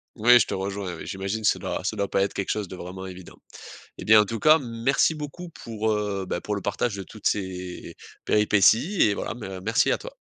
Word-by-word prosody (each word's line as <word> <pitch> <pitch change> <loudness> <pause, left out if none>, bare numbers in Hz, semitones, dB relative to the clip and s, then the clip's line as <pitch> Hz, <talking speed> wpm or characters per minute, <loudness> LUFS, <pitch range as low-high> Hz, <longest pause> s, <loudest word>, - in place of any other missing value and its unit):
Oui, 120 +2 +6
je - - +3
te - - -5
rejoins, 95 -2 -4
oui, - - -9
j'imagine 100 +3 -4
ça - - +3
doit - - -4
ça 110 - -2
doit 100 -1 -1
pas 95 - 0
être 100 - -1
quelque 100 - -2
chose 105 -3 -2
de 95 - -8
vraiment 95 +1 -8
évident. 90 -1 -11 0.6
Eh - - -7
bien, 110 0 +7
en 105 - +4
tout 115 +2 -4
cas, 155 +1 +6
merci 125 +5 +1
beaucoup 150 +4 -7
pour, 110 -9 -4
heu, 105 -2 -2
ben 85 - -3
pour 105 - -3
le 100 - -4
partage 100 +2 -2
de 95 - -5
toutes 110 +1 -4
ces, 90 -2 -4 0.3
péripéties 105 - +3
et 105 - +3
voilà, - - -4
ben 95 -5 -7
merci - - +2
à - - +2
toi. - - -10
105 Hz, 235 wpm, -25 LUFS, 95-115 Hz, 0.6 s, bien